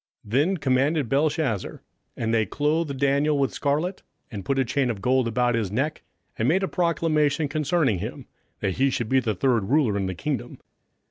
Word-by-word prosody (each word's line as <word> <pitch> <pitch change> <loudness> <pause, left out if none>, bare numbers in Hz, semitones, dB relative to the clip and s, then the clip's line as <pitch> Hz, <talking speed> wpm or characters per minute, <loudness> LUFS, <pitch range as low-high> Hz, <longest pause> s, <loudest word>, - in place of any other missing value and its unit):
27:005:029 105 - -13
Then 150 +10 +2
commanded 140 -1 +1
Belshazzar, 140 - 0 0.4
and 115 -1 -1
they 110 -1 +3
clothed 150 - 0
Daniel 140 +2 +2
with 135 -1 0
scarlet, 155 +7 -1 0.3
and 100 -4 -6
put 135 +5 -1
a 135 - +2
chain 130 +2 0
of 110 -4 -3
gold 125 +3 +2
about 120 +1 +1
his 110 -5 -1
neck, 140 +8 -1 0.4
and 110 - +1
made 185 +6 +2
a - - +1
proclamation 160 -4 +1
concerning 150 - +1
him, - - -6 0.4
that 95 - -1
he 135 +1 +3
should 120 -4 -2
be 130 - +4
the 110 -4 -1
third 115 +1 +1
ruler 135 -7 +3
in 95 -1 -1
the 95 - -4
kingdom. 80 - -4
135 Hz, 190 wpm, -25 LUFS, 115-150 Hz, 0.4 s, be